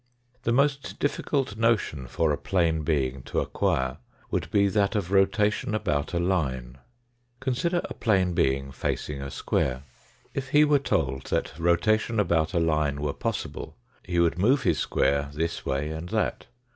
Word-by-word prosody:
The 115 Hz, -, +2 dB
most 140 Hz, +2 st, +1 dB
difficult 135 Hz, -5 st, -1 dB
notion 110 Hz, -, +1 dB
for 80 Hz, +5 st, +1 dB
a -, -, +2 dB
plane 85 Hz, -4 st, +1 dB
being 70 Hz, -4 st, 0 dB
to -, -, -1 dB
acquire 65 Hz, +1 st, 0 dB, 0.3 s
would -, -, -1 dB
be 100 Hz, -1 st, +3 dB
that 100 Hz, +1 st, +1 dB
of 95 Hz, -3 st, -1 dB
rotation 105 Hz, +3 st, +2 dB
about 85 Hz, -7 st, -1 dB
a -, -, +2 dB
line. 65 Hz, -9 st, -1 dB, 0.6 s
Consider 165 Hz, +7 st, 0 dB
a -, -, -6 dB
plane 95 Hz, -5 st, +1 dB
being 70 Hz, -3 st, +1 dB
facing 70 Hz, +1 st, -3 dB
a 70 Hz, -, -5 dB
square. 65 Hz, -1 st, -1 dB, 0.5 s
If 135 Hz, -1 st, -4 dB
he 150 Hz, +1 st, +6 dB
were 145 Hz, -1 st, +4 dB
told 65 Hz, -, -1 dB
that -, -, -1 dB
rotation 105 Hz, +7 st, +2 dB
about 85 Hz, -3 st, +1 dB
a -, -, +4 dB
line 75 Hz, -3 st, +1 dB
were 75 Hz, -1 st, -1 dB
possible, -, -, -4 dB, 0.2 s
he 90 Hz, -1 st, -4 dB
would 85 Hz, 0 st, +2 dB
move 130 Hz, +9 st, +3 dB
his -, -, +2 dB
square 70 Hz, 0 st, +1 dB
this 80 Hz, +3 st, -3 dB
way 70 Hz, +3 st, -1 dB
and 80 Hz, +3 st, -6 dB
that. 110 Hz, +1 st, -1 dB
85 Hz, 160 wpm, -26 LUFS, 70-110 Hz, 0.6 s, he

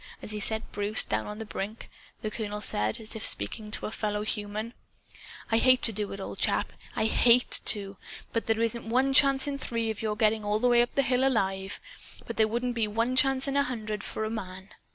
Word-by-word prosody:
As -, -, -4 dB
he 210 Hz, -, -1 dB
set 220 Hz, +2 st, +1 dB
Bruce 205 Hz, +1 st, -1 dB
down 110 Hz, 0 st, -2 dB
on 210 Hz, -, -7 dB
the 220 Hz, -, -6 dB
brink, 210 Hz, +1 st, -6 dB, 0.4 s
the 215 Hz, -, -3 dB
colonel 210 Hz, -1 st, -4 dB
said, 110 Hz, -, +1 dB
as 220 Hz, +1 st, -10 dB
if 220 Hz, -, -5 dB
speaking 210 Hz, -, -2 dB
to 215 Hz, -, -2 dB
a -, -, -4 dB
fellow 210 Hz, -1 st, -2 dB
human: 215 Hz, +1 st, -4 dB, 0.8 s
"I 225 Hz, -, +4 dB
hate 255 Hz, 0 st, +4 dB
to 225 Hz, -, +7 dB
do 205 Hz, 0 st, -3 dB
it, 195 Hz, -, -7 dB
old 195 Hz, -, -7 dB
chap. -, -, 0 dB, 0.2 s
I -, -, +1 dB
HATE 240 Hz, +2 st, +4 dB
to! 200 Hz, -2 st, +1 dB, 0.4 s
There 225 Hz, -1 st, 0 dB
isn't 230 Hz, 0 st, -2 dB
one 260 Hz, +3 st, +2 dB
chance 275 Hz, -1 st, +6 dB
in 280 Hz, -1 st, -3 dB
three 230 Hz, -3 st, -2 dB
of 220 Hz, -, -7 dB
your 215 Hz, -1 st, -1 dB
getting 215 Hz, 0 st, +1 dB
all 210 Hz, 0 st, 0 dB
the 245 Hz, +3 st, +2 dB
way 240 Hz, 0 st, +5 dB
up 240 Hz, -, -2 dB
the 275 Hz, -, +3 dB
hill 255 Hz, 0 st, +2 dB
alive. 195 Hz, -7 st, 0 dB, 0.5 s
But 230 Hz, -, -7 dB
there 220 Hz, -1 st, +4 dB
wouldn't 240 Hz, +3 st, -2 dB
be 230 Hz, -2 st, 0 dB
one 230 Hz, +4 st, -1 dB
chance 270 Hz, 0 st, +4 dB
in 275 Hz, -, -2 dB
a 280 Hz, -, +4 dB
hundred, 220 Hz, -6 st, -4 dB
for 220 Hz, -, -4 dB
a 215 Hz, -, -4 dB
MAN. 190 Hz, -3 st, -7 dB
220 Hz, 225 wpm, -28 LUFS, 210-240 Hz, 0.8 s, to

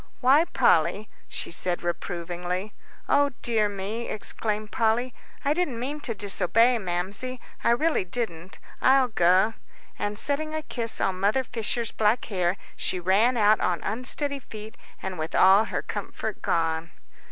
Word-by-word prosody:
"Why, 275 Hz, +6 st, +5 dB
Polly," 210 Hz, -9 st, +2 dB, 0.2 s
she -, -, -5 dB
said, 175 Hz, +1 st, -1 dB
reprovingly. 175 Hz, +3 st, -3 dB, 0.3 s
"O 285 Hz, -1 st, +3 dB
dear 220 Hz, -3 st, +2 dB
me!" 205 Hz, +4 st, -4 dB
exclaimed 215 Hz, 0 st, -3 dB
Polly, 230 Hz, +2 st, +1 dB, 0.3 s
"I 285 Hz, -, +3 dB
didn't 300 Hz, -8 st, -1 dB
mean 280 Hz, +5 st, -3 dB
to 235 Hz, -6 st, -3 dB
disobey, 230 Hz, +4 st, +2 dB
Mamsie, 195 Hz, +7 st, -3 dB, 0.2 s
I -, -, +3 dB
really 300 Hz, +2 st, +2 dB
didn't; 185 Hz, -3 st, -4 dB, 0.2 s
I'll 265 Hz, -1 st, +5 dB
go." 185 Hz, +2 st, +3 dB, 0.5 s
And 205 Hz, 0 st, -2 dB
setting 310 Hz, +5 st, -1 dB
a 310 Hz, -, -3 dB
kiss 235 Hz, -6 st, -3 dB
on 185 Hz, -1 st, 0 dB
Mother 210 Hz, +7 st, +2 dB
Fisher's 230 Hz, -1 st, -2 dB
black 220 Hz, +2 st, +1 dB
hair, 185 Hz, -2 st, 0 dB, 0.2 s
she 185 Hz, -, -1 dB
ran 205 Hz, +8 st, +3 dB
out 215 Hz, 0 st, +5 dB
on 175 Hz, -1 st, 0 dB
unsteady 275 Hz, +5 st, 0 dB
feet, 215 Hz, -3 st, -10 dB, 0.3 s
and 185 Hz, -3 st, -4 dB
with 155 Hz, +1 st, -3 dB
all 195 Hz, +3 st, +6 dB
her -, -, -3 dB
comfort -, -, -5 dB
gone. 165 Hz, 0 st, 0 dB
215 Hz, 145 wpm, -26 LUFS, 185-250 Hz, 0.5 s, all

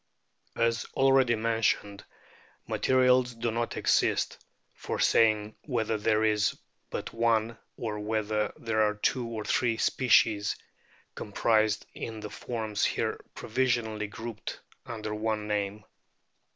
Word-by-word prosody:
As 115 Hz, -1 st, +1 dB
already 135 Hz, -3 st, +4 dB
mentioned, 110 Hz, -2 st, 0 dB, 0.6 s
materials 125 Hz, -1 st, +3 dB
do 115 Hz, 0 st, -1 dB
not 115 Hz, +1 st, -2 dB
exist -, -, +1 dB, 0.3 s
for -, -, -4 dB
saying 110 Hz, -1 st, +3 dB
whether 115 Hz, -5 st, 0 dB
there 110 Hz, +1 st, +2 dB
is 105 Hz, -1 st, +2 dB, 0.3 s
but -, -, -5 dB
one 115 Hz, -1 st, +1 dB, 0.2 s
or 110 Hz, -3 st, -3 dB
whether 105 Hz, 0 st, -1 dB
there 110 Hz, -1 st, 0 dB
are 105 Hz, 0 st, +2 dB
two 120 Hz, +3 st, 0 dB
or 110 Hz, -2 st, -5 dB
three 115 Hz, -3 st, +1 dB
species 110 Hz, -5 st, +3 dB, 0.6 s
comprised 110 Hz, +1 st, +1 dB
in 110 Hz, -1 st, -6 dB
the 105 Hz, -1 st, -7 dB
forms 110 Hz, -3 st, -3 dB
here -, -, 0 dB
provisionally 115 Hz, -3 st, 0 dB
grouped 115 Hz, +1 st, -7 dB, 0.3 s
under 110 Hz, -2 st, -4 dB
one 105 Hz, 0 st, -2 dB
name. 105 Hz, 0 st, -2 dB
110 Hz, 115 wpm, -29 LUFS, 105-115 Hz, 0.6 s, already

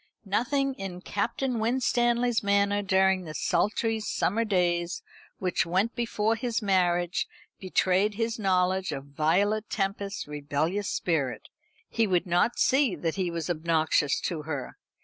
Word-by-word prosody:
Nothing 270 Hz, +7 st, 0 dB
in 185 Hz, -2 st, -6 dB
Captain 235 Hz, +6 st, -2 dB
Winstanley's 240 Hz, 0 st, +1 dB
manner 200 Hz, 0 st, +2 dB
during 190 Hz, -1 st, +3 dB
the 155 Hz, -1 st, -7 dB
sultry 220 Hz, +5 st, 0 dB
summer 215 Hz, +1 st, 0 dB
days 175 Hz, -4 st, 0 dB, 0.3 s
which 185 Hz, -2 st, 0 dB
went 190 Hz, +7 st, 0 dB
before 225 Hz, -2 st, 0 dB
his 235 Hz, 0 st, -1 dB
marriage 180 Hz, -3 st, +1 dB, 0.3 s
betrayed 190 Hz, +2 st, +1 dB
his 225 Hz, +1 st, -2 dB
knowledge 190 Hz, -1 st, +1 dB
of 135 Hz, -1 st, -5 dB
Violet 190 Hz, +10 st, +1 dB
Tempest's 200 Hz, -1 st, -2 dB
rebellious 150 Hz, +7 st, -2 dB
spirit. 150 Hz, -7 st, -1 dB, 0.4 s
He 225 Hz, -1 st, +1 dB
would 180 Hz, -3 st, +1 dB
not 180 Hz, +7 st, +1 dB
see 265 Hz, -5 st, +3 dB
that 165 Hz, -2 st, -2 dB
he 185 Hz, -3 st, -1 dB
was 170 Hz, -2 st, -4 dB
obnoxious 160 Hz, -3 st, +1 dB
to 165 Hz, -4 st, -2 dB
her. 145 Hz, -4 st, -5 dB
190 Hz, 130 wpm, -27 LUFS, 175-220 Hz, 0.4 s, during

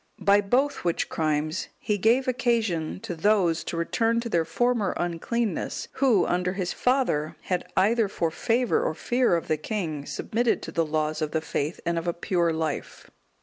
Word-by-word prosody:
(195) -, -, -13 dB, 0.2 s
By 195 Hz, -, -14 dB
both 285 Hz, +2 st, 0 dB
which 170 Hz, -2 st, 0 dB
crimes 155 Hz, +1 st, -1 dB
he 210 Hz, -2 st, -1 dB
gave 240 Hz, +6 st, +3 dB
occasion 225 Hz, -11 st, 0 dB
to -, -, -5 dB
those 175 Hz, -2 st, +2 dB
to 170 Hz, -, -4 dB
return 230 Hz, +7 st, +1 dB
to 235 Hz, -, -5 dB
their 170 Hz, -6 st, +1 dB
former 230 Hz, +4 st, 0 dB
uncleanness, 175 Hz, +4 st, -2 dB
who, 240 Hz, -10 st, +3 dB
under 180 Hz, +1 st, 0 dB
his 185 Hz, -2 st, -2 dB
father, 250 Hz, -, +1 dB
had, 180 Hz, -1 st, -3 dB
either 215 Hz, +3 st, +3 dB
for 165 Hz, -4 st, -1 dB
favour 245 Hz, -, +1 dB
or -, -, -1 dB
fear 245 Hz, -6 st, +2 dB
of 170 Hz, -, -3 dB
the 155 Hz, -, +1 dB
king, 155 Hz, -4 st, -4 dB
submitted 235 Hz, +1 st, 0 dB
to -, -, -6 dB
the 165 Hz, -3 st, 0 dB
laws 155 Hz, 0 st, -1 dB
of 155 Hz, -1 st, -2 dB
the 160 Hz, -, +2 dB
faith 155 Hz, +1 st, -3 dB
and 170 Hz, 0 st, +1 dB
of 165 Hz, -, -7 dB
a 170 Hz, -, +1 dB
pure 170 Hz, -1 st, 0 dB
life. 160 Hz, -2 st, -4 dB
180 Hz, 185 wpm, -26 LUFS, 160-230 Hz, 0.2 s, gave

